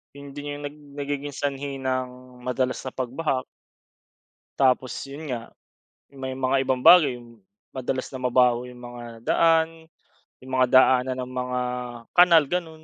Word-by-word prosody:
'Yon 140 0 -10
din 145 0 -6
yung 145 - -9
nag 145 +1 -6 0.2
nagiging 145 0 -4
sanhi 140 0 -3
ng 125 -1 -4
madalas 130 0 -1
na 130 - -5
pagbaha. 130 +1 -2 1.2
Tapos 130 -1 +2 0.2
yun 145 +2 -8
nga, 115 -1 -5 0.7
may 130 -1 -5
mga 135 +1 0
ibang 130 -1 0
bagay 155 -6 +7 0.6
madalas 130 0 -3
na 130 - -6
mabaho 125 -1 +3
yung 125 0 -13
mga 120 0 -9 0.2
daan 165 -1 +4 0.7
yung 130 - -10
mga 130 - +5
daanan 130 0 +5
ng 130 - -11
mga 125 0 -2 0.6
kanal 170 -3 +7
ganun. 165 -3 -4
130 Hz, 140 wpm, -25 LUFS, 125-145 Hz, 1.2 s, bagay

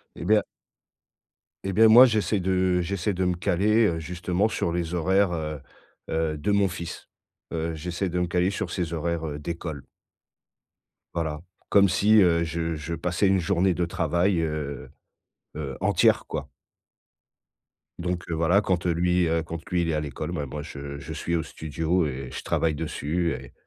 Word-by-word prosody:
Et - - -7
bien 105 -1 +4 1.2
et 95 -1 -2
bien 110 +3 +6
moi 120 +4 +10
j'essaie 110 -4 +1
de 95 -1 +1
j'essaie 100 +3 -1
de 95 0 -1
me 90 0 +1
caler, 105 +6 +2
heu, 80 -1 -1
justement 90 +4 -1
sur 85 - -1
les 85 0 -2
horaires, 95 +2 +2
heu 75 -2 -3 0.5
heu, 80 -1 -1
de 80 +8 -1
mon 100 -1 +3
fils. 85 -1 -7 0.4
Heu, 80 0 -2
j'essaie 90 +4 -3
de 90 +1 -1
me 90 - 0
caler 90 +2 +1
sur - - -3
ses 85 -3 -2
horaires 80 -2 -2
d'école. 80 -2 -6 1.3
Voilà, 80 -3 -2 0.3
comme 100 -1 +5
si, 100 +5 +4
heu, 85 -2 +4
je 85 0 -2
je 75 +2 -5
passais 90 +4 0
une 95 0 +3
journée 90 +1 +2
de 90 +1 0
travail, 85 +3 +1
heu 75 -4 -4 0.7
heu, 70 -3 -4
entière, - - +3
quoi. - - -5 1.5
Donc, 90 0 -2
heu, 85 - -1
voilà, 85 +5 +3
quand, 90 -3 -1
heu, 90 - +3
lui, 90 +1 +2
heu, 80 0 +1
quand, 85 +1 -6
lui, 90 -1 +2
il 85 - 0
est 80 - 0
à 75 - +1
l'école, 75 +3 -5
ben, 75 -5 -3
moi 75 +2 -6
je 70 -2 -7
je - - -7
suis 85 - -2
au 85 - +1
studio 80 +3 -1
et 65 -2 -4
je - - -6
travaille 80 -2 0
dessus 80 +2 -1
et - - -9
85 Hz, 175 wpm, -26 LUFS, 80-90 Hz, 1.5 s, moi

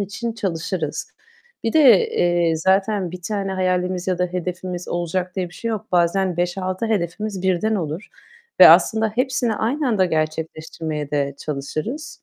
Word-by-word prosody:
için 205 +4 -3
çalışırız. 165 -6 -3 0.5
Bir 225 - 0
de, 255 - +6
eee, 175 -2 +1
zaten 190 +1 +1
1 180 0 -9
tane 200 -1 -2
hayalimiz 185 -1 -1
ya 185 -2 0
da 180 - +2
hedefimiz 180 0 -5
olacak 180 +2 -2
diye 185 -2 -1
bir 175 - -16
şey 230 - -4
yok. 215 -3 -4
Bazen 180 +1 +2
5-6 185 +3 -2
hedefimiz 200 -1 -2
birden 190 +4 +1
olur 165 +1 -4 0.5
ve - - +12
aslında 220 0 +5
hepsini 255 -2 0
aynı 260 +7 -1
anda 205 -5 +3
gerçekleştirmeye 155 -2 -3
de 140 -2 -1
çalışırız. 155 - -5
185 Hz, 145 wpm, -21 LUFS, 170-210 Hz, 0.5 s, ve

